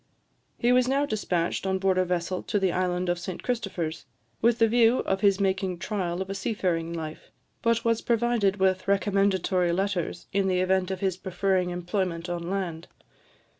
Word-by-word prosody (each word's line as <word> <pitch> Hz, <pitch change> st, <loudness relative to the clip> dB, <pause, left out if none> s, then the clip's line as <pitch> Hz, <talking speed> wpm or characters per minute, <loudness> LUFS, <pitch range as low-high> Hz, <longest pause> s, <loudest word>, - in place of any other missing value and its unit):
He 240 Hz, -, +2 dB
was 250 Hz, 0 st, +4 dB
now 275 Hz, +2 st, +2 dB
despatched 190 Hz, -6 st, -1 dB
on 190 Hz, 0 st, +1 dB
board 190 Hz, -1 st, +2 dB
a 185 Hz, -, +2 dB
vessel 180 Hz, +1 st, -2 dB
to -, -, -1 dB
the 190 Hz, -2 st, +2 dB
island 180 Hz, 0 st, -1 dB
of 175 Hz, 0 st, 0 dB
St 180 Hz, 0 st, -6 dB
Christopher's, 185 Hz, -, -3 dB, 0.3 s
with 235 Hz, 0 st, +4 dB
the 225 Hz, -, +4 dB
view 235 Hz, +1 st, +4 dB
of 190 Hz, 0 st, -1 dB
his 200 Hz, -1 st, +4 dB
making 190 Hz, -2 st, 0 dB
trial 185 Hz, -1 st, -2 dB
of 190 Hz, -, -16 dB
a -, -, -1 dB
seafaring 180 Hz, -5 st, -1 dB
life, 160 Hz, -2 st, -6 dB, 0.3 s
but 230 Hz, 0 st, +1 dB
was 230 Hz, -1 st, +2 dB
provided 235 Hz, -4 st, +1 dB
with 190 Hz, -1 st, +1 dB
recommendatory 195 Hz, -3 st, +2 dB
letters, 180 Hz, -1 st, -2 dB
in 195 Hz, 0 st, +2 dB
the 185 Hz, -1 st, +1 dB
event 185 Hz, 0 st, +1 dB
of 190 Hz, -1 st, -4 dB
his 190 Hz, -2 st, 0 dB
preferring 185 Hz, 0 st, 0 dB
employment 175 Hz, -1 st, -2 dB
on 170 Hz, 0 st, -3 dB
land. 175 Hz, -4 st, -3 dB
190 Hz, 175 wpm, -27 LUFS, 180-205 Hz, 0.3 s, was